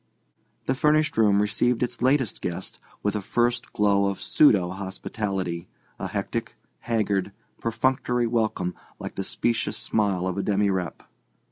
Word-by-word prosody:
The 130 Hz, -, +2 dB
furnished 150 Hz, +3 st, +2 dB
room 105 Hz, -3 st, +4 dB
received 115 Hz, +4 st, +1 dB
its 120 Hz, -1 st, -3 dB
latest 130 Hz, -3 st, +2 dB
guest 90 Hz, +1 st, -4 dB, 0.2 s
with 105 Hz, +1 st, 0 dB
a 105 Hz, -, -1 dB
first 120 Hz, +4 st, 0 dB
glow 100 Hz, -1 st, +3 dB
of 100 Hz, -1 st, -2 dB
pseudo 95 Hz, -12 st, +4 dB
hospitality, 95 Hz, -2 st, -3 dB, 0.3 s
a 95 Hz, -, -2 dB
hectic, 105 Hz, +3 st, -3 dB, 0.2 s
haggard, 100 Hz, -4 st, 0 dB, 0.3 s
perfunctory 120 Hz, +1 st, +1 dB
welcome 110 Hz, -6 st, 0 dB, 0.2 s
like -, -, -6 dB
the 95 Hz, -, -3 dB
specious 115 Hz, +1 st, 0 dB
smile 105 Hz, -5 st, 0 dB
of 95 Hz, +1 st, -1 dB
a -, -, +2 dB
demirep. 100 Hz, -3 st, 0 dB
105 Hz, 135 wpm, -25 LUFS, 95-120 Hz, 0.3 s, room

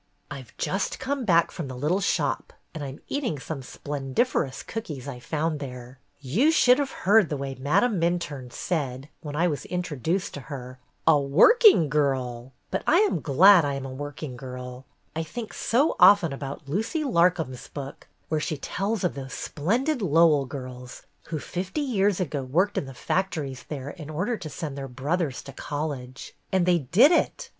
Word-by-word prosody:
"I -, -, -5 dB
've -, -, -16 dB
just -, -, -1 dB
come 275 Hz, -1 st, -2 dB
back 170 Hz, -4 st, +4 dB
from 165 Hz, -, -5 dB
the 130 Hz, -1 st, -7 dB
little 155 Hz, +9 st, +1 dB
shop 200 Hz, -, -1 dB, 0.2 s
and 155 Hz, -3 st, -5 dB
I -, -, -4 dB
'm 135 Hz, +1 st, -9 dB
eating 255 Hz, -, -2 dB
some 140 Hz, +1 st, -6 dB
splendiferous 140 Hz, -, -2 dB
cookies 150 Hz, -, -6 dB
I 130 Hz, -3 st, -6 dB
found 155 Hz, +3 st, -2 dB
there. 125 Hz, -1 st, -8 dB, 0.2 s
"You 165 Hz, -, +2 dB
should 255 Hz, -5 st, +5 dB
have 280 Hz, -2 st, 0 dB, 0.2 s
heard 205 Hz, -2 st, +5 dB
the 150 Hz, -, -2 dB
way 135 Hz, 0 st, -4 dB
Madame 180 Hz, -, +1 dB
Minturne 155 Hz, -7 st, -2 dB
said, 140 Hz, -5 st, -3 dB
when 145 Hz, -2 st, -6 dB
I 170 Hz, +3 st, +2 dB
was 150 Hz, -4 st, -3 dB
introduced 180 Hz, 0 st, -2 dB
to -, -, -6 dB
her, 130 Hz, -3 st, -7 dB, 0.3 s
'A 155 Hz, -2 st, +6 dB
working 170 Hz, -, +6 dB
girl 130 Hz, -4 st, -1 dB
!' -, -, -43 dB
But 190 Hz, -, -1 dB
I 315 Hz, -, +5 dB
am 425 Hz, -, +1 dB
glad 175 Hz, +6 st, +7 dB
I 140 Hz, -1 st, -1 dB
am 135 Hz, -1 st, -5 dB
a 135 Hz, -, -6 dB
work 145 Hz, +3 st, -7 dB
ing 130 Hz, -5 st, -5 dB
girl. 125 Hz, 0 st, -8 dB, 0.3 s
I 160 Hz, -, -1 dB
think 220 Hz, +8 st, -6 dB
so 270 Hz, +7 st, +1 dB
often 190 Hz, -7 st, +7 dB
about 140 Hz, +1 st, -7 dB
Lucy 220 Hz, -, -1 dB
Lar 180 Hz, -, +4 dB
com's 155 Hz, -8 st, -6 dB
book, 140 Hz, -1 st, -8 dB, 0.2 s
where 155 Hz, -, 0 dB
she 155 Hz, -, -2 dB
tells 195 Hz, +8 st, -2 dB
of 180 Hz, -, +1 dB
those 135 Hz, -1 st, -7 dB
splendid 240 Hz, -, -1 dB
Lowell 160 Hz, -5 st, +4 dB
girls 125 Hz, -2 st, -8 dB, 0.2 s
who 160 Hz, -, -3 dB
fifty 185 Hz, -, -4 dB
years 205 Hz, -8 st, +1 dB
ago 150 Hz, -6 st, -2 dB
worked 180 Hz, +11 st, +1 dB
in -, -, -1 dB
the 135 Hz, -, -10 dB
factories 150 Hz, -6 st, -2 dB
there 145 Hz, -2 st, -5 dB
in 155 Hz, -3 st, -10 dB
order 185 Hz, +10 st, -1 dB
to 160 Hz, -7 st, -7 dB
send 150 Hz, -3 st, -5 dB
their 135 Hz, -1 st, -5 dB
brothers 140 Hz, +3 st, -2 dB
to 140 Hz, -, -10 dB
college. 140 Hz, -3 st, -5 dB, 0.2 s
And 190 Hz, -2 st, +2 dB
they 180 Hz, -1 st, +4 dB
did 200 Hz, -, +5 dB
it! 345 Hz, -, +1 dB
155 Hz, 185 wpm, -26 LUFS, 135-190 Hz, 0.3 s, glad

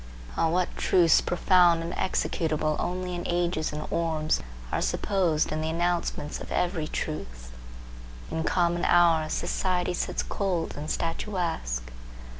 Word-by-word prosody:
O, 165 Hz, -, +2 dB
what 180 Hz, +2 st, 0 dB
truths 170 Hz, -3 st, +4 dB
profound 175 Hz, -2 st, +4 dB
and 170 Hz, -, -4 dB
executable 155 Hz, -4 st, 0 dB
only 180 Hz, 0 st, -2 dB
in 175 Hz, -, -3 dB
ages 175 Hz, -2 st, 0 dB
and 150 Hz, 0 st, -5 dB
orbs, 160 Hz, -2 st, 0 dB, 0.3 s
are -, -, 0 dB
supposed 180 Hz, -6 st, +1 dB
in 155 Hz, 0 st, -1 dB
the 160 Hz, -, -1 dB
announcement 170 Hz, -3 st, -1 dB
of -, -, -8 dB
every 175 Hz, -4 st, 0 dB
truth! -, -, -5 dB, 0.8 s
In 160 Hz, -, -1 dB
common 175 Hz, 0 st, +1 dB
hours, 165 Hz, -3 st, +4 dB
society 180 Hz, -1 st, 0 dB
sits -, -, -2 dB
cold 185 Hz, -5 st, -2 dB
and 150 Hz, +2 st, -5 dB
statuesque. 165 Hz, -, -2 dB
170 Hz, 130 wpm, -27 LUFS, 155-175 Hz, 0.8 s, truths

